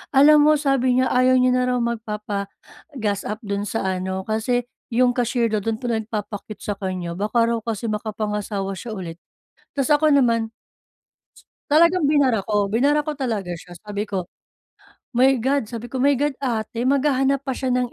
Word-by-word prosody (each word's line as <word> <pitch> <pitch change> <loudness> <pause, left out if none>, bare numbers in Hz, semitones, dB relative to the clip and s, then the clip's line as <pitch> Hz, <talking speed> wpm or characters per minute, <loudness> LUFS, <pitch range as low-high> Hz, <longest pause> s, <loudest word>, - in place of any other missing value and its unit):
"Alam 295 +3 +7
mo, 305 0 +6
sabi 275 -4 +1
niya, 260 - +1
ayaw 255 +1 +4
niya 255 0 +4
na 250 - +2
raw - - +1
magpapa-gas 210 +1 -4
up 210 +4 -4
dun 200 0 -2
sa 225 - -2 0.2
ano, 190 +1 -3
kasi, 220 +4 0 0.3
yung 250 +1 +4
cashier 240 -1 0
dun, 210 -2 -1
dun 225 - +1
pa 245 - -3
nagpapa-cute 215 -2 -5
sa 205 -2 -3
kanya 185 -3 -3
baka 210 +6 +1
raw 230 0 +1
kasi 225 0 -4
makapangasawa 210 -2 -3
siya 225 +3 -6
ulit". 175 -3 -7 0.6
Tas 275 -1 0
ako 300 +1 +4
naman. 230 -4 +2 1.2
Talagang 335 +1 +5
binara 280 -6 +3
ko, 205 -2 +1
binara 285 +7 +2
ko 305 - -3
talaga 230 -10 -3
siya 175 0 -13
sabi 210 0 -4
ko, 190 -3 -2 0.9
"My 260 +2 +4
God" 260 -1 0
sabi 230 0 -6
ko, 260 - -2
"My 280 +1 +4
God 290 +3 0
ate, 230 -3 -2
maghahanap 275 0 +2
pa 265 - -2
siya 260 +1 -3
ng 250 -1 0
235 Hz, 170 wpm, -22 LUFS, 210-265 Hz, 1.2 s, Alam